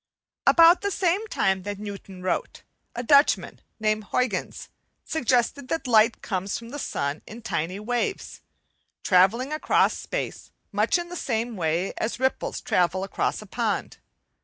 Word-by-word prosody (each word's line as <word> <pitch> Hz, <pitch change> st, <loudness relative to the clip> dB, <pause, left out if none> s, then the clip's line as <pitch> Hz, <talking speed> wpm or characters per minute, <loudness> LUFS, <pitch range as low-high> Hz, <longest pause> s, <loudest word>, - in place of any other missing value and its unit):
About 335 Hz, +1 st, +7 dB
the 405 Hz, -, 0 dB
same 385 Hz, +3 st, 0 dB
time 190 Hz, -, +1 dB
that 205 Hz, +1 st, -5 dB
Newton 200 Hz, -2 st, -8 dB
wrote, 185 Hz, -, -2 dB, 0.3 s
a 240 Hz, -, -3 dB
Dutchman, 280 Hz, +4 st, +3 dB, 0.2 s
named 215 Hz, 0 st, 0 dB
Huyghens, 215 Hz, -4 st, -2 dB, 0.4 s
suggested 255 Hz, -2 st, 0 dB
that 325 Hz, 0 st, -2 dB
light 230 Hz, -1 st, +4 dB
comes 195 Hz, 0 st, -2 dB
from 230 Hz, 0 st, -10 dB
the 290 Hz, +4 st, -6 dB
sun 140 Hz, -, -3 dB
in 225 Hz, +2 st, -10 dB
tiny 180 Hz, 0 st, -2 dB
waves, 245 Hz, -, -3 dB, 0.6 s
travelling 215 Hz, +10 st, +3 dB
across 310 Hz, -, +2 dB
space -, -, -5 dB, 0.2 s
much -, -, +2 dB
in 345 Hz, 0 st, -5 dB
the 355 Hz, -, -7 dB
same 235 Hz, -6 st, -2 dB
way 170 Hz, +1 st, -1 dB
as 225 Hz, +2 st, -2 dB
ripples 260 Hz, 0 st, -1 dB
travel 180 Hz, +1 st, +1 dB
across 195 Hz, -, -2 dB
a -, -, -13 dB
pond. -, -, -2 dB
225 Hz, 145 wpm, -25 LUFS, 195-280 Hz, 0.6 s, About